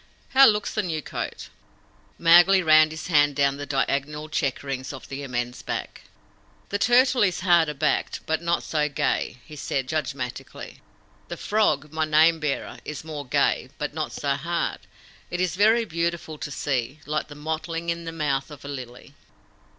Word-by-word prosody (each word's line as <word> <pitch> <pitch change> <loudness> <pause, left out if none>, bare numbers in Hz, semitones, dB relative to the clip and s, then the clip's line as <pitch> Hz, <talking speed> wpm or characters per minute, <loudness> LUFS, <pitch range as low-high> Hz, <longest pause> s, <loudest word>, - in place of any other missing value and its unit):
How 270 0 +8
looks 210 -1 +1
the 215 - +1
new 160 -6 -3
coat?" - - -5 0.7
Mowgli 175 +3 +6
ran 155 -1 +6
his 160 0 -7
hand 145 -4 +3
down 140 0 +2
the 145 0 -6
diagonal 145 +2 -1
checkerings 135 -3 -2
of 135 - -10
the 135 +1 -5
immense 125 -2 -4
back. - - -5 0.6
"The 200 - -1
Turtle 250 +2 +4
is 185 -4 +2
harder 170 -4 +3
backed, 150 +2 0
but 160 +1 -1
not 170 0 0
so 150 -1 0
gay," 140 -2 -1
he 155 - -11
said 135 -2 -2
judgmatically. 140 -4 -5 0.5
"The - - -6
Frog, 155 -9 +1
my 160 0 0
name 160 +2 +4
bearer, 150 -3 -3
is 150 -1 -6
more 150 -4 -7
gay, - - +1
but - - -4
not - - -3
so 140 - -3
hard. 170 +5 -2 0.5
It 180 - -3
is 180 -2 0
very 220 +4 +4
beautiful 170 -3 -3
to - - -5
see 135 -1 -2
like 150 +1 -2
the 145 - -11
mottling 160 +2 -4
in 170 0 -5
the 165 - -4
mouth 140 -4 -1
of 145 -2 -11
a - - -6
lily." 130 0 -8
155 Hz, 170 wpm, -25 LUFS, 140-170 Hz, 0.7 s, How